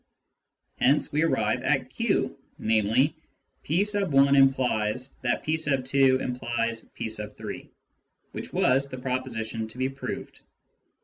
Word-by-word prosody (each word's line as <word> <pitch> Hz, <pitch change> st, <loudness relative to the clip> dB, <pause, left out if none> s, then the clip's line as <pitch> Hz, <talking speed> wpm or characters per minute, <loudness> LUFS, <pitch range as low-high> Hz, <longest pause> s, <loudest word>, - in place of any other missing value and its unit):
Hence 140 Hz, +3 st, +3 dB
we 150 Hz, +1 st, +1 dB
arrive 165 Hz, -, +1 dB
at -, -, 0 dB
q, -, -, 0 dB, 0.2 s
namely, 110 Hz, +7 st, +2 dB, 0.2 s
" -, -, -46 dB
p 165 Hz, +6 st, +1 dB
x 210 Hz, +1 st, 0 dB
implies 135 Hz, -, +3 dB
that 120 Hz, -1 st, 0 dB
p 155 Hz, +1 st, 0 dB
2 135 Hz, -3 st, +3 dB
implies 120 Hz, -2 st, -2 dB
p -, -, -3 dB
3 105 Hz, -1 st, -7 dB, 0.3 s
," -, -, -47 dB
which -, -, -7 dB
was 135 Hz, +2 st, +2 dB
the 130 Hz, -, -6 dB
proposition 120 Hz, -4 st, -3 dB
to 110 Hz, -, -13 dB
be 130 Hz, +1 st, 0 dB
proved. 135 Hz, +1 st, -6 dB
130 Hz, 130 wpm, -27 LUFS, 115-140 Hz, 0.3 s, Hence